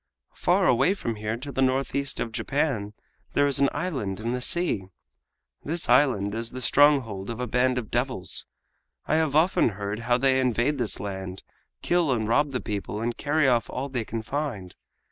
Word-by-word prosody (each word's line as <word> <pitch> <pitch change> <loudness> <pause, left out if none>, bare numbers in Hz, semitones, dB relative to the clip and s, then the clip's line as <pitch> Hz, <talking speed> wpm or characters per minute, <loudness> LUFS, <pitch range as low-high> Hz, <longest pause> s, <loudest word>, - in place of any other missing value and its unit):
Far - - +2
away 135 +11 +3
from 115 - -4
here 110 +2 -3
to 140 +4 -7
the 135 - -2
northeast 135 +1 0
of 115 - -2
Japan 115 -5 -1 0.4
there 145 - +3
is 140 -2 +2
an 140 -1 +4
island 135 - -3
in 115 +2 -2
the 125 0 -2
sea. 170 - +1 0.8
This 165 +3 -2
island 105 -8 +3
is 115 +1 -3
the 130 - -7
stronghold 125 -8 +3
of 115 0 -5
a 125 - -1
band 125 +2 +1
of 115 -4 -4
devils. 120 -6 0 0.6
I 155 - +1
have 155 -3 0
often 160 -4 +4
heard 100 +1 -3
how 120 +1 +1
they 130 +1 +3
invade 130 +3 +1
this 115 -5 -1
land, 95 -1 -6 0.4
kill 175 -4 +2
and 110 -4 0
rob 145 +6 +2
the 130 - -2
people, 105 -2 -4
and 115 +1 -2
carry 150 0 +1
off 120 -3 +2
all 135 +2 -4
they 125 -3 -2
can 110 0 -5
find. 115 -9 -4
125 Hz, 185 wpm, -26 LUFS, 110-140 Hz, 0.8 s, an